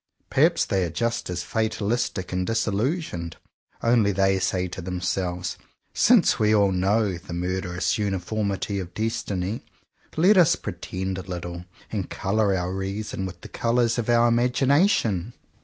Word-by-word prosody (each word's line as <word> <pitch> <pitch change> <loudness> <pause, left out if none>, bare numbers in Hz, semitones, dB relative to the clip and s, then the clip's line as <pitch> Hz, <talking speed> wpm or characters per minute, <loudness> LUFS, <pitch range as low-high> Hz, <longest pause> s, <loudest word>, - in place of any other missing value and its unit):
Perhaps - - +3
they 95 -1 0
are 85 - -1
just 115 +6 -2
as 90 -1 -3
fatalistic 110 -2 -1
and 90 0 -1
disillusioned. 110 - -1 0.5
Only 115 -3 +4
they 95 0 +2
say 90 0 0
to 90 +1 -7
themselves, 90 0 -3 0.3
"Since - - +4
we 110 0 +4
all 100 -2 +4
know 95 0 +1
the 90 -1 -9
murderous 90 +1 -1
uniformities 100 0 -2
of 90 -1 -9
destiny, 105 -2 -2 0.6
let 190 +6 +5
us 175 -1 +6
pretend 95 0 -4
a - - -4
little, 85 -1 -6 0.3
and 100 -5 -3
colour 100 0 +1
our 90 +1 -2
reason 95 0 -3
with 90 -1 -10
the - - -9
colours 120 0 +1
of 120 - -3
our 120 0 +5
imagination!" 125 - +2
100 Hz, 140 wpm, -25 LUFS, 90-115 Hz, 0.6 s, us